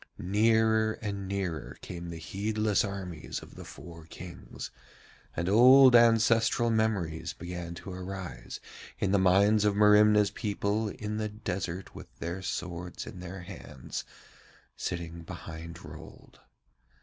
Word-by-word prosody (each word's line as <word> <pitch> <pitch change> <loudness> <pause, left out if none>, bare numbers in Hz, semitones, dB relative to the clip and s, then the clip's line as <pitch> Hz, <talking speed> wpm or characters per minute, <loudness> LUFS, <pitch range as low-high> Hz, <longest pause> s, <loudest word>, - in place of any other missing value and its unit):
Nearer 110 +2 +3
and 100 -3 -5
nearer 95 -6 -3
came 85 -1 -7
the 85 - -6
heedless 105 +5 0
armies 95 -6 -5
of - - -13
the - - -9
four 85 -2 -11
Kings, 85 +1 -9 0.6
and 85 - -1
old 125 +5 +8
ancestral 115 0 +4
memories 90 -8 0
began 85 0 -6
to 95 +2 -8
arise 90 -9 -6 0.4
in 95 - 0
the 100 - +4
minds 100 +3 +4
of 105 -1 +2
Merimna's 105 0 +6
people 105 0 -1
in 105 +1 -4
the 110 0 -2
desert 95 -4 -4
with - - -10
their 85 +3 -4
swords 90 -1 -5
in 90 - -9
their 90 +1 -7
hands 80 -8 -7 0.7
sitting 85 -1 -4
behind 85 0 -8
Rold. - - -12
95 Hz, 125 wpm, -29 LUFS, 85-105 Hz, 0.7 s, old